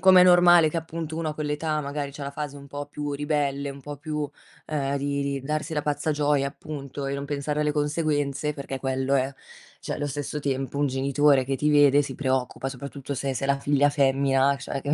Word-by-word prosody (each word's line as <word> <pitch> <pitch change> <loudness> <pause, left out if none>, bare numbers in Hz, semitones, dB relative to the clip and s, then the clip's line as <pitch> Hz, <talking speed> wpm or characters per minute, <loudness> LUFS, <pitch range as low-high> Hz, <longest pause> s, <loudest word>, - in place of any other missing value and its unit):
com'è 185 -1 +8
normale 175 -2 +7
che 165 - -4
appunto 160 -1 -4
uno 165 -1 -1
a 150 - -6
quell'età 155 +1 -1
magari 140 -1 -4
c'ha 145 - -10
una 140 - -3
fase 145 0 -5
un 140 - -12
po' 145 +1 -5
più 145 0 -4
ribelle, 140 -1 -1
un 140 - -10
po' 145 +2 -7
più, 150 +2 -5 0.5
uhm, 140 -2 -1
di 140 0 -1
di 140 -1 -2
darsi 150 +4 -3
alla 150 - 0
pazza 150 +1 -1
gioia 145 -2 +2
appunto 140 -1 -6
e 140 - -2
non 140 0 -4
pensare 145 +1 -2
alle 150 0 +1
conseguenze, 150 -1 0
perché 140 -2 -5
quello 135 +1 0
è. 135 0 +1 0.5
Cioè, - - -4
lo 145 - -2
stesso 145 +1 -4
tempo 135 -1 -2
un 145 - +2
genitore 135 +1 +3
che 135 0 0
ti 150 +2 +1
vede 145 -1 +6
si 135 -2 -6
preoccupa, 130 0 -1
soprattutto 140 +1 -6
se 135 0 -2
se 135 +2 -2
la 140 0 +2
figlia 145 0 +3
femmina 135 -1 +3
cioè 135 0 -5
che 145 - -3
145 Hz, 215 wpm, -26 LUFS, 140-150 Hz, 0.5 s, com'è